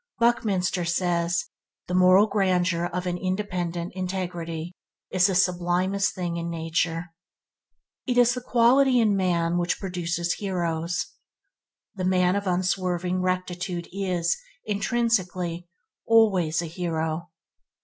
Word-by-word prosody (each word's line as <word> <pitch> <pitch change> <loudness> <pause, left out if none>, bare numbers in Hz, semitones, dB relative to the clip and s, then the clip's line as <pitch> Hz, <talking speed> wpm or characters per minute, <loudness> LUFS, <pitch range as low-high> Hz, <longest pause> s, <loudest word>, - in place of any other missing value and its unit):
Buckminster 200 -7 +1
says, 170 0 0 0.4
"The 180 - -5
moral 185 +2 +6
grandeur 185 -4 +1
of 180 +1 -3
an 175 0 -2
independent 180 -2 -3
integrity 175 -3 -4 0.4
is 185 0 +4
the 190 - -1
sublimest 180 +2 +1
thing 175 -3 -3
in 170 0 -3
nature." 165 +1 -2 0.9
It 250 -1 0
is 245 0 +5
the 250 - -4
quality 250 +2 +4
in 215 -3 +3
man 175 -2 +1
which 175 0 -1
produces 175 -2 -2
heroes. 175 -3 -2 0.9
The 190 - -5
man 180 0 +3
of 200 -1 -2
unswerving 180 0 0
rectitude 180 -1 -2
is, 180 -3 0 0.3
intrinsically, 195 -5 -1 0.4
always 190 -8 +3
a - - -4
hero. 165 0 -3
180 Hz, 115 wpm, -25 LUFS, 175-195 Hz, 0.9 s, moral